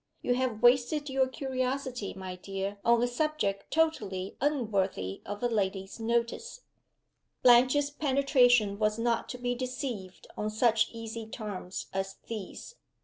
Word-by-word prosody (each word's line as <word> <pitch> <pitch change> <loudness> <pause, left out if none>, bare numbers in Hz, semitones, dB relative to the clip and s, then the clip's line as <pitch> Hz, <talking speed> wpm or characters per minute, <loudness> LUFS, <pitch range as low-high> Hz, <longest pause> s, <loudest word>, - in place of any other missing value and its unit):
"You 245 - +2
have 245 -3 -1
wasted 265 +4 +4
your 265 0 +3
curiosity, 260 -4 -3
my 190 -1 -6
dear, 195 +2 -5
on 235 0 +4
a - - +3
subject 245 -7 -1
totally 205 -13 0
unworthy 200 - 0
of 205 +3 -5
a - - +4
lady's 195 -2 -2
notice." 235 - -1 0.8
Blanche's 255 +4 +6
penetration 255 -7 +3
was 215 0 +1
not 230 0 0
to 250 - -5
be 245 0 -1
deceived 245 -6 -5
on 210 - -2
such 220 +1 +3
easy 230 -1 -6
terms 205 -5 -5
as 195 0 -2
these. 225 - -7
235 Hz, 135 wpm, -30 LUFS, 200-260 Hz, 0.8 s, Blanche's